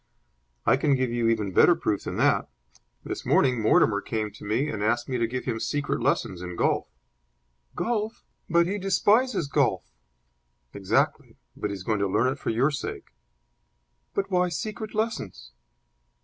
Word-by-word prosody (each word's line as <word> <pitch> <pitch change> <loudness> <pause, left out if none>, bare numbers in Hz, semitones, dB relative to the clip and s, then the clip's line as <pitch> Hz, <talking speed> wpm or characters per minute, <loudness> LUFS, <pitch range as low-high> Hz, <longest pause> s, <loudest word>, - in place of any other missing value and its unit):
"I 120 +4 +4
can 140 0 +2
give 130 -2 0
you 120 -1 0
even 105 -4 0
better 175 - +6
proof 105 -10 -2
than - - -4
that. - - +2 0.5
This - - -5
morning 125 -4 +3
Mortimer 105 -1 +3
came 110 -2 -3
to 105 - -14
me 110 +8 0
and 110 -8 -4
asked 120 +2 +1
me 125 -2 -2
to 115 - +1
give 125 +2 -4
him 115 -3 -2
secret 140 +5 -2
lessons 90 -2 0
in 90 -1 -6
golf." - - +1 0.9
"Golf! 225 -2 -2 0.3
But 170 +1 +4
he 200 +4 -2
despises 205 - +2
golf." - - 0 0.8
"Exactly. 95 -2 0 0.2
But 105 - -3
he 100 - -3
is 95 - -8
going 105 +1 0
to 100 - +1
learn 125 +7 +2
it 140 - -12
for - - -3
your 125 +6 +2
sake." 140 - -6 1.0
"But 195 0 -1
why 180 -1 +2
secret 215 +4 -5
lessons?" 215 - -3
125 Hz, 165 wpm, -26 LUFS, 110-175 Hz, 1.0 s, better